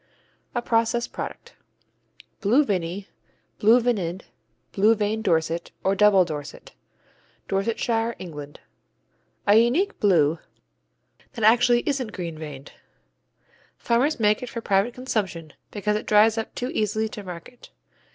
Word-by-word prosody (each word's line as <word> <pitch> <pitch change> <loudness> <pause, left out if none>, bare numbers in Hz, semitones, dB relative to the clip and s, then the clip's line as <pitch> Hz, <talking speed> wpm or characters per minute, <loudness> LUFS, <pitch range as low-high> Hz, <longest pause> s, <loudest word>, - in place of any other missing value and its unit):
_ - - -39 0.5
A 240 - -1
process 230 +1 +1
product. - - -8 0.9
Blue 250 +9 +3
Vinny, 190 -1 -3 0.5
Blue 225 +4 +6
Vinid, 195 -7 -1 0.5
Blue 215 +3 +4
veined 215 +1 -1
Dorset, 165 -3 0
or 190 - +2
Double 195 -2 +5
Dorset 150 -2 -8 0.8
Dorsetshire, 225 +3 -1
England 150 -5 -9 0.9
A 205 +1 +6
unique 275 - +2
Blue 165 -6 +3 0.9
that 230 -5 -5
actually 240 +2 +5
isn't 260 -7 -2
green 170 -3 -5
veined. 145 -3 -9 1.1
Farmers 255 +5 +1
make 210 -1 +2
it 250 - -6
for 235 - -5
private 205 +2 +1
consumption, 190 - -3 0.2
because 210 0 -1
it 215 - -4
dries 215 +1 +5
up 225 -1 -5
too 250 +1 -3
easily 215 +1 0
to 210 - -8
market. 185 +6 -10
210 Hz, 125 wpm, -24 LUFS, 180-235 Hz, 1.1 s, Blue